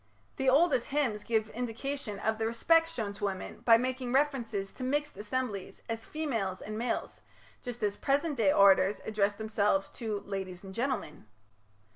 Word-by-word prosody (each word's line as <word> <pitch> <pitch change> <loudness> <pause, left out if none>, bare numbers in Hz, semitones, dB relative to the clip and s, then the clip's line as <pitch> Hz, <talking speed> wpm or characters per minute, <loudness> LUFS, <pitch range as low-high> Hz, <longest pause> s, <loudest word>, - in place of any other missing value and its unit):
The 265 0 +2
oldest 275 -3 +4
hymns 255 -8 0
give 220 -2 0
indication 245 0 -4
of 220 +2 -1
the 220 - +1
respect 330 +8 +3
shown 220 -11 -3
to 205 +1 -3
women 190 -2 -4
by 230 -1 +6
making 255 0 -2
reference 270 -4 +1
to 200 +4 -4
mixed 295 +3 -1
assemblies 210 -2 -4
as 225 -1 -4
"females 230 -12 -2
and 215 - -6
males", 235 +3 -3 0.4
just 245 -2 -6
as 205 -1 0
present 290 +2 +1
day 205 -4 +4
orators 195 0 +5
address 205 -2 +1
themselves 205 -2 0
to 215 -4 -4
"ladies 190 -2 -5
and 190 -1 -9
gentlemen". 230 - -3
225 Hz, 160 wpm, -31 LUFS, 200-260 Hz, 0.4 s, by